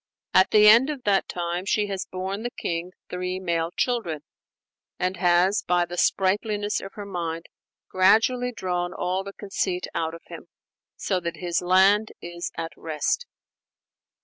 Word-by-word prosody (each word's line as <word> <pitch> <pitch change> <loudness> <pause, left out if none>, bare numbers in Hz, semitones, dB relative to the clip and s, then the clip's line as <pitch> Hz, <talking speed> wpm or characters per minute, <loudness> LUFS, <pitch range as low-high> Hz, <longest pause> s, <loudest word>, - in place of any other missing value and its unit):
At 185 +1 +5
the 210 0 +6
end 235 +6 +7
of 285 -4 -5
that 200 -3 +2
time 175 0 -3
she 205 +2 +1
has 195 -2 -4
borne 190 +2 -4
the 240 - -3
king 175 -5 -4 0.2
three 180 +1 -3
male 170 -3 -1
children; 200 - -1 0.8
and 185 +1 -1
has, 175 +3 +3
by 175 0 +1
the 175 - -7
sprightliness 205 +3 +1
of 195 - -9
her 205 - -7
mind, 170 -4 -4 0.4
gradually 225 +7 +3
drawn 180 -5 -3
all 185 +2 -1
the 200 0 -8
conceit 190 -3 -2
out 160 0 -2
of 165 - -13
him, - - -10 0.5
so 190 -2 -1
that 170 -1 -4
his 175 +1 -1
land 190 +4 +4
is 175 0 -6
at 165 0 -4
rest. 160 - -2
185 Hz, 155 wpm, -25 LUFS, 175-205 Hz, 0.8 s, end